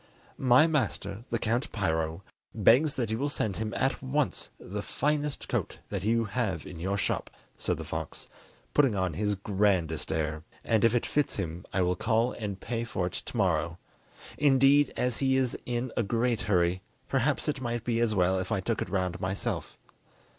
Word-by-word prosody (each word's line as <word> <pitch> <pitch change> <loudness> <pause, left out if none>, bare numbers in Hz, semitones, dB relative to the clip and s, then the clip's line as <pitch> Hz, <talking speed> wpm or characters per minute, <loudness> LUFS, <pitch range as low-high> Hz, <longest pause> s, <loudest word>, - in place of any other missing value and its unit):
"My 130 +3 +6
master, 120 -9 -1
the 115 - +1
Count 115 +4 -1
Piro, 80 -3 -1 0.3
begs 125 +8 +5
that 115 -4 -1
you 110 - -1
will 145 +2 0
send 110 -8 -1
him 110 0 -2
at 135 - 0
once 140 +2 -1
the 105 +2 -5
finest 150 +5 -1
coat - - -2
that 100 -3 -3
you 115 +2 +2
have 100 -6 -2
in 90 - -8
your 95 +4 -1
shop," - - -1 0.3
said - - -1
the - - -5
fox, - - -5 0.5
putting 135 -7 +4
on 95 -3 0
his 105 +4 0
grandest 95 -5 0
air, 80 -1 -1 0.2
"and 110 -3 +2
if 115 +1 +4
it 120 - +1
fits 150 -1 0
him 85 -3 -4
I 95 0 +2
will 90 0 +1
call 115 +5 +1
and 100 -4 -5
pay 115 -1 -3
for 95 -6 -2
it 90 - -4
to - - -6
morrow! 85 -4 +1 0.6
Indeed, 140 0 +5
as 125 -2 0
he 130 -1 +3
is 130 -2 +1
in 120 0 -2
a - - +2
great 115 +2 +1
hurry, 90 -1 +2 0.3
perhaps 135 +3 +1
it 145 -3 -1
might 120 -2 -2
be 115 -1 0
as 115 -2 +2
well 95 0 +3
if 95 +2 -4
I 105 - +2
took 110 +3 -1
it - - -3
round 90 -2 -1
myself." 95 +2 -3
110 Hz, 190 wpm, -29 LUFS, 95-125 Hz, 0.6 s, My